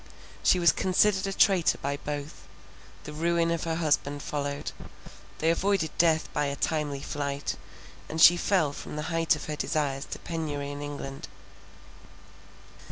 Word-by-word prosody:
She - - +4
was 170 -3 +5
considered 190 +2 +2
a - - -2
traitor 190 -4 +4
by 140 +1 -3
both, 145 0 -6 0.6
the 150 - -8
ruin 170 +2 +1
of 170 -1 -1
her 165 -1 -1
husband 145 -3 0
followed; 140 -1 -3 0.7
they 160 +1 +2
avoided 185 -3 0
death 160 -2 +3
by 150 - +1
a 140 - -2
timely 145 -2 -1
flight, 140 -1 -3 0.5
and 160 - -4
she 175 +2 +9
fell 175 -5 +1
from - - -8
the 150 +3 -4
height 165 -1 +3
of 150 - -7
her 150 - -3
desires 145 -2 -1
to - - -6
penury 145 -4 -4
in 145 0 -6
England. 140 -2 -6
155 Hz, 155 wpm, -28 LUFS, 145-170 Hz, 0.7 s, she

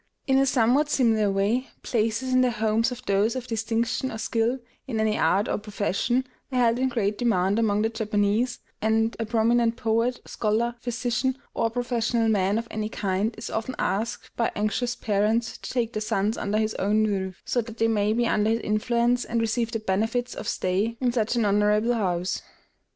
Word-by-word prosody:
In 265 0 +3
a 275 - +3
somewhat 260 +4 +3
similar 225 -7 +3
way, 205 +7 +1 0.2
places 230 +3 0
in 255 - +5
the 255 - +3
homes 220 +1 +1
of 250 0 -8
those 200 +4 +2
of 255 -2 -4
distinction 230 +2 -1
or 220 - -5
skill 230 +3 0 0.3
in 230 -4 -2
any 220 -1 +2
art 190 +6 +2
or - - -1
profession 210 +4 -1 0.3
are 255 - -1
held 240 -1 +3
in 260 0 +2
great 210 -4 -1
demand 205 -3 +2
among 210 -2 +2
the 225 - +2
Japanese; 215 +2 0 0.2
and 225 +1 +1
a 225 - -2
prominent 230 +1 +2
poet, 235 0 0
scholar, 225 +2 0
physician, 245 +2 -1 0.2
or 230 - +1
professional 235 -1 0
man 200 -1 +2
of 230 0 -3
any 215 0 -3
kind 200 +1 -1
is 225 - -6
often 225 +3 -3
asked 220 +4 -2
by 230 - 0
anxious 240 +4 -1
parents 215 +2 0
to - - -7
take 240 -2 -1
their 215 - -2
sons 210 +1 0
under 205 +1 -1
his 215 0 0
own 210 +3 +2
roof, 190 -3 -2
so 245 - +1
that 230 0 -10
they 225 - +2
may 210 -2 +1
be 235 +2 +1
under 215 -2 +2
his 225 +1 +1
influence, 235 +3 +1
and 235 - -1
receive 230 +1 0
the 230 - -1
benefits 225 +4 -1
of - - -7
stay 200 +6 0
in 250 -2 +1
such 230 -1 0
an 235 -2 +2
honorable 210 +3 +3
house. 185 -5 -1
225 Hz, 190 wpm, -25 LUFS, 210-240 Hz, 0.3 s, in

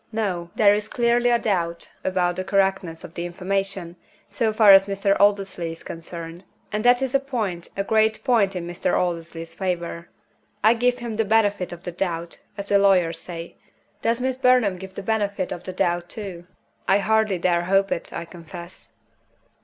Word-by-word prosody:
No! 190 -6 -2
There 205 -1 +6
is 210 +1 -1
clearly 240 +1 +2
a 240 - +4
doubt 170 -7 -2
about 180 -1 0
the 185 - -3
correctness 190 -4 0
of 165 - -10
the 170 - -4
information, 185 0 -3 0.3
so 230 -3 0
far 215 -2 +7
as 195 0 +7
Mr. 195 0 +1
Aldersley 195 -5 +1
is 165 - -13
concerned 165 +1 -8 0.3
and 210 +1 -2
that 245 +2 +5
is 265 - -1
a 275 - +4
point, 220 -11 -3
a 195 - 0
great 220 +1 +2
point 215 -7 +2
in 175 -1 -4
Mr. 175 0 -1
Aldersley's 165 -1 -3
favor. 170 -2 -3 0.5
I 220 +2 +7
give 245 +1 +1
him 235 -3 -5
the 225 - +3
benefit 205 -3 +1
of 175 0 -9
the 175 - -4
doubt, 170 -1 -4 0.2
as 200 - -4
the 200 0 +3
lawyers 180 -5 +3
say. 170 -1 -8 0.4
Does 230 +1 +1
Miss 260 0 -2
Burnham 250 -7 +3
give 190 +1 -8
him - - -29
the 200 - -6
benefit 205 -3 -1
of 175 - -6
the 185 - -4
doubt 175 -2 0
too? 185 -5 -7 0.4
I 195 - +5
hardly 215 -1 +2
dare 175 0 +1
hope 195 +1 +2
it, - - -3
I 170 - -5
confess." 170 +1 -11
195 Hz, 185 wpm, -23 LUFS, 175-215 Hz, 0.5 s, far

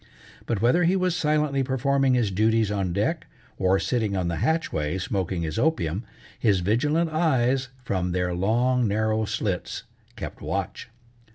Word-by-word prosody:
But 110 -2 -1
whether 145 +10 +4
he 175 +3 +3
was 185 -2 +1
silently 150 -4 +1
performing 135 0 +2
his 115 -5 +1
duties 110 +2 +2
on 95 -3 -1
deck, 130 - -1 0.3
or 95 0 +3
sitting 110 -3 -1
on 90 -2 0
the 85 - -2
hatchway 95 - 0
smoking 95 -5 -2
his 80 +3 -3
opium, 110 - 0 0.4
his 100 -6 +2
vigilant 150 - +1
eyes 135 -5 +2 0.2
from 95 -6 -1
their 90 0 0
long, 120 +6 +2
narrow 110 +1 +1
slits 100 -4 -3 0.3
kept - - -7
watch. - - -4
115 Hz, 150 wpm, -25 LUFS, 95-140 Hz, 0.4 s, whether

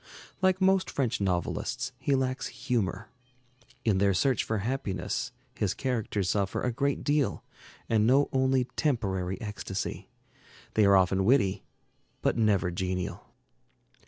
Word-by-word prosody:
Like 185 0 +3
most 190 0 +3
French 125 -6 -1
novelists, 100 +7 -1
he 140 - +1
lacks 130 0 -1
humor. 115 - -2 0.8
In 105 -4 +3
their 100 -1 +3
search 130 +5 +2
for 110 - -1
happiness 105 -1 -2 0.2
his 105 -6 -1
characters 110 -7 -1
suffer 100 -2 -1
a 125 - +1
great 140 +4 -1
deal 145 -2 +1 0.4
and 110 -1 +3
know 135 +3 +4
only 130 -1 +3
temporary 95 - -1
ecstasy. 105 -2 -5 0.6
They 110 - +4
are 100 0 +6
often 95 0 +3
witty, 100 -4 +2 0.6
but - - +2
never 100 -5 +2
genial. 90 0 -3
110 Hz, 130 wpm, -29 LUFS, 95-130 Hz, 0.8 s, are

